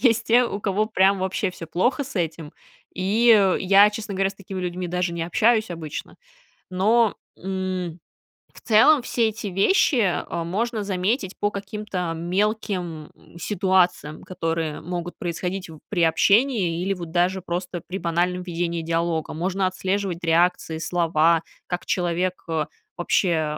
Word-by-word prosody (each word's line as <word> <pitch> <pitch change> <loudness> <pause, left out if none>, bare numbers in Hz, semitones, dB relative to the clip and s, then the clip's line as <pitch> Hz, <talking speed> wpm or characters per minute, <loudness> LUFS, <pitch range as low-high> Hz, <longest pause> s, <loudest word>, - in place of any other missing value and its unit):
есть 230 -4 +3
те, 240 +2 +5
у 205 - -3
кого 205 +1 0
прям 195 -2 +3
вообще 190 0 -1
всё 170 -2 -9
плохо 240 - 0
с 270 -4 -9
этим. 160 -3 -3 0.4
И 210 +6 +1 0.3
я, 200 +2 +6
честно 210 -1 -6
говоря, 195 0 +1
с - - -13
такими 195 0 -8
людьми 180 0 -3
даже 180 0 -1
не 170 -1 -3
общаюсь 215 +5 +2
обычно. 160 -3 -6 0.5
Но, 210 +4 +3 0.2
м, 185 -2 -4 0.5
в - - -15
целом 255 +6 +5
все 235 -2 +1
эти 215 -1 -6
вещи, 235 - +3
а, 170 -2 -1
можно 215 +5 -2
заметить 195 +1 -1
по 205 - +1
каким-то 200 -4 -4
мелким, 180 -2 -2
м, - - -18
ситуациям, 185 -5 +1
которые 165 -3 -3
могут 175 +1 -5
происходить 180 +2 -4 0.2
при 185 -4 -1
общении 195 +1 +3
или 195 +1 0
вот 175 -3 -7
даже 180 +2 +1
просто 175 0 -4
при 185 - -4
банальном 175 +1 -1
ведении 170 -1 -2
диалога. 165 -1 -1
Можно 185 +4 -1
отслеживать 185 -1 -2
реакции, 170 0 +2
слова, 165 -1 +2 0.2
как 175 0 -4
человек, 180 +1 -1
э, 160 -2 -1 0.3
вообще 165 -4 +1
180 Hz, 145 wpm, -23 LUFS, 170-200 Hz, 0.5 s, я